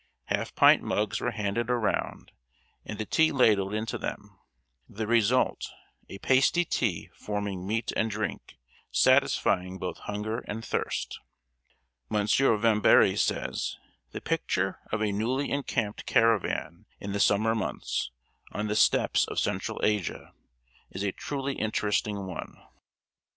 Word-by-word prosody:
Half - - -3
pint - - +6
mugs 105 -1 -1
were - - 0
handed 110 +1 -2
around 120 -3 -1 0.5
and 110 - -7
the 110 - -3
tea 160 +8 +3
ladled 105 -8 +3
into 110 +1 -3
them: - - -6 0.5
the 110 +2 -4
result, 115 +2 +2 0.4
a 95 - -7
pasty 135 - +3
tea 105 - -1
forming 100 -3 -4
meat 115 +2 -1
and 115 - +1
drink, 110 - -5 0.3
satisfying 90 +1 +2
both 90 - -5
hunger 105 +2 -4
and 110 +2 -5
thirst. - - -3 0.9
M. 105 -1 0
Vámbéry 110 -2 +4
says: - - -1 0.3
"The - - -7
picture 95 +1 -1
of 110 0 0
a 105 - +1
newly 125 +7 -1
encamped 120 -7 -2
caravan 115 -4 +1
in 100 - -5
the 100 - -2
summer 110 +3 +3
months, 110 - -2 0.4
on 105 - -3
the 105 0 -1
steppes - - +3
of - - -6
Central - - -1
Asia, 105 -4 -1 0.6
is 95 - -5
a 100 - 0
truly 140 +5 -4
interesting 105 -2 -1
one. 90 - -7
105 Hz, 130 wpm, -28 LUFS, 100-115 Hz, 0.9 s, pint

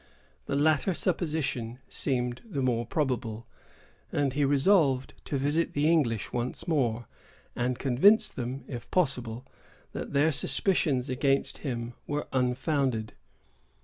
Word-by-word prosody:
The - - -1
latter 155 +5 +2
supposition 150 -10 -1
seemed 125 -2 -1
the 160 - -3
more 120 -2 0
probable; 120 -6 -2 0.7
and 140 -2 0
he 145 +1 +1
resolved 140 -1 +3
to 140 - -2
visit 145 +5 0
the 145 +1 +2
English 135 -10 +1
once 125 +6 -3
more, 120 -8 0 0.5
and 125 0 -1
convince 145 - +4
them, 125 +2 -5
if 120 -3 -7
possible, 125 -8 0 0.5
that - - -6
their 145 +3 +4
suspicions 145 -4 +2
against 135 +1 0
him 120 -4 -4
were 145 +1 -2
unfounded. 130 -2 0
135 Hz, 120 wpm, -28 LUFS, 125-150 Hz, 0.7 s, convince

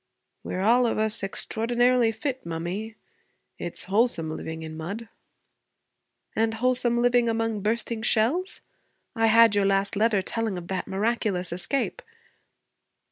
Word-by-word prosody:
'We're 185 - -4
all 240 +3 +4
of - - -1
us 220 +1 +1
extraordinarily 240 +4 +1
fit, 260 +3 -4
mummy. 175 +7 -5 0.6
It's 175 - -4
wholesome, 190 -5 +1
living 160 0 -6
in 160 0 -7
mud.' 200 +9 -6 1.3
'And 225 0 +1
wholesome 245 0 +2
living 245 -1 +3
among 225 -2 -1
bursting 225 +2 -1
shells? 245 - +1 0.5
I 225 -1 +3
had 225 0 +6
your 205 -1 +2
last 195 +1 +1
letter 210 -2 +2
telling 225 -2 -2
of 175 -1 -8
that 190 -1 -3
miraculous 195 -3 -1
escape.' 275 - -1
220 Hz, 130 wpm, -26 LUFS, 195-235 Hz, 1.3 s, had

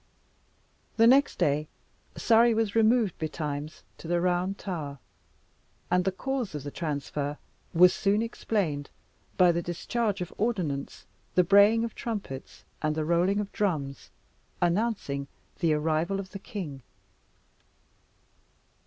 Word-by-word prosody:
The 225 - +6
next 270 +4 +5
day, 150 -3 +1 0.5
Surrey 230 0 +4
was 220 -2 0
removed 225 -3 +3
betimes 150 -1 -4 0.2
to - - -9
the 175 +1 +1
Round 180 +2 0
Tower, 155 -7 -5 0.9
and 180 0 +3
the 190 - +2
cause 255 - -3
of 145 - -5
the 145 - -6
transfer 145 -2 -3 0.3
was 180 +2 +6
soon 205 +2 +1
explained 180 -11 -2 0.5
by 180 -2 +6
the 170 0 -1
discharge 205 +5 -2
of 180 - -5
ordnance, 180 -11 -2 0.3
the 180 - +6
braying 205 +5 +5
of 230 - -3
trumpets 200 - -6 0.2
and 155 0 0
the 155 -1 -1
rolling 175 +5 +2
of 205 -1 -3
drums, 150 -10 -2 0.5
announcing 175 -7 0 0.3
the 165 -2 +2
arrival 160 +5 0
of 190 -1 -7
the 195 - -7
king. 175 - -6
180 Hz, 125 wpm, -28 LUFS, 155-210 Hz, 0.9 s, The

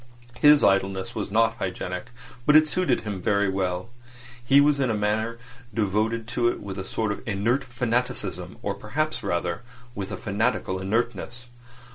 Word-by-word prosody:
His 150 0 +7
idleness 95 -1 +2
was - - -3
not 115 +2 +2
hygienic, 90 0 -4 0.4
but 150 - +6
it 155 0 +7
suited 180 +3 +1
him 100 -4 -5
very 100 +2 +2
well. 95 +2 -2 0.5
He 135 +3 +5
was 145 0 +4
in 130 -2 +1
a 110 - +1
manner 110 +2 -1 0.3
devoted 110 +2 0
to 120 0 +1
it 120 - 0
with 100 -1 -6
a - - -3
sort 110 +2 -2
of 105 - -4
inert 115 +6 +1
fanaticism, 120 -7 -2
or 100 - -1
perhaps 145 +11 -2
rather 85 +1 -2 0.3
with 100 -1 -5
a 95 - -4
fanatical 105 -2 -1
inertness. 120 +4 -2
110 Hz, 160 wpm, -25 LUFS, 95-120 Hz, 0.5 s, His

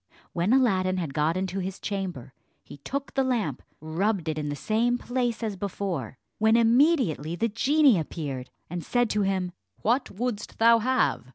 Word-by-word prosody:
When 175 +5 +1
Aladdin 190 -8 +3
had 165 -6 -3
got 155 +4 +1
into 190 0 -2
his 190 0 -4
chamber, 180 - -4 0.3
he - - -12
took 275 - -5
the 270 - +2
lamp, 225 - -1 0.2
rubbed 170 +3 -1
it 155 0 -2
in 150 -1 -3
the 145 - -2
same 225 - +1
place 245 -2 -2
as 215 -3 -2
before, 180 - -4 0.2
when 220 +1 +4
immediately 235 - +3
the 230 +6 0
genie 270 - +4
appeared, 140 -5 -5 0.2
and 175 0 -5
said 245 -2 +1
to 210 - +1
him, 190 -2 0 0.3
"What 245 +4 +1
wouldst 235 +1 -4
thou 230 0 +6
have? 255 - +1
200 Hz, 170 wpm, -26 LUFS, 165-240 Hz, 0.3 s, thou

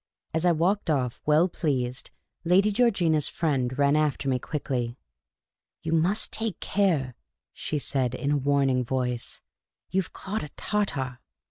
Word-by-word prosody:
As 160 +2 +2
I - - +6
walked 175 +4 +1
off, 130 -5 0
well 155 +4 +5
pleased, 130 -7 -2 0.3
Lady 190 +5 +4
Georgina's 190 - +3
friend 130 -6 -1
ran 140 0 +4
after 150 -2 +1
me 130 -1 +1
quickly. 125 -5 -3 0.4
" - - -60
You 160 - -2
must 170 +6 +2
take 220 -3 -3
care," 165 -11 +1 0.4
she 155 - -3
said, 130 -3 0
in 140 +3 -1
a 145 - +3
warning 135 -2 +2
voice. 125 -1 -2 0.2
" - - -65
You 190 - +2
've 180 - -10
caught 210 +3 -4
a 150 - -6
Tartar." 135 - -1
150 Hz, 155 wpm, -27 LUFS, 130-180 Hz, 0.4 s, I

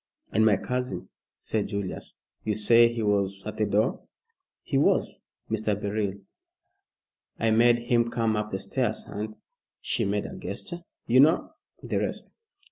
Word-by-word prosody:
"And 110 - +3
my 105 -3 +5
cousin," 125 +4 -3 0.3
said 110 -2 -2
Julius. 100 -3 -5 0.3
"You 105 - 0
say 115 +3 +6
he 115 -1 -3
was 100 -2 +1
at 105 0 -5
the 110 - +1
door?" 105 +2 +1 0.6
"He - - -3
was, - - +2 0.3
Mr. 105 -2 0
Beryl. 105 -1 -1 1.3
I 115 0 +2
made 120 +2 +5
him 120 -1 +1
come 115 -2 +1
up 105 0 -1
the 95 - -2
stairs 120 +2 -1
and" 110 +1 -5 0.4
she - - -1
made - - 0
a - - -7
gesture 175 -1 -6 0.3
"you 125 +2 +4
know 155 +5 +5 0.3
the - - -1
rest." - - -3
110 Hz, 150 wpm, -27 LUFS, 105-120 Hz, 1.3 s, say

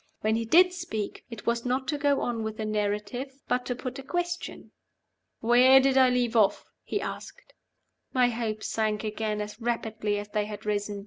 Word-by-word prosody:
When 215 +1 +2
he 230 0 -1
did 360 +9 +6
speak, 220 - -5
it 230 -3 -9
was 235 0 0
not 255 +1 -1
to 300 - 0
go 285 -1 +2
on 235 -2 -2
with 220 0 -4
the 220 - -3
narrative, 215 +6 -2
but 250 0 0
to 245 - -1
put 255 +2 -6
a - - -5
question. 350 +4 -4 0.7
"Where 250 +3 +7
did 265 0 +2
I 260 -1 +6
leave 245 -2 0
off?" 205 -3 +3 0.2
he - - -2
asked. - - -8 0.6
My 250 -1 +4
hopes 225 -2 -3
sank 215 -1 -1
again 215 0 -2
as 210 +2 -7
rapidly 220 -3 -1
as 205 0 -6
they 210 0 -1
had 210 0 -8
risen. 205 -1 -2
230 Hz, 190 wpm, -27 LUFS, 210-260 Hz, 0.7 s, Where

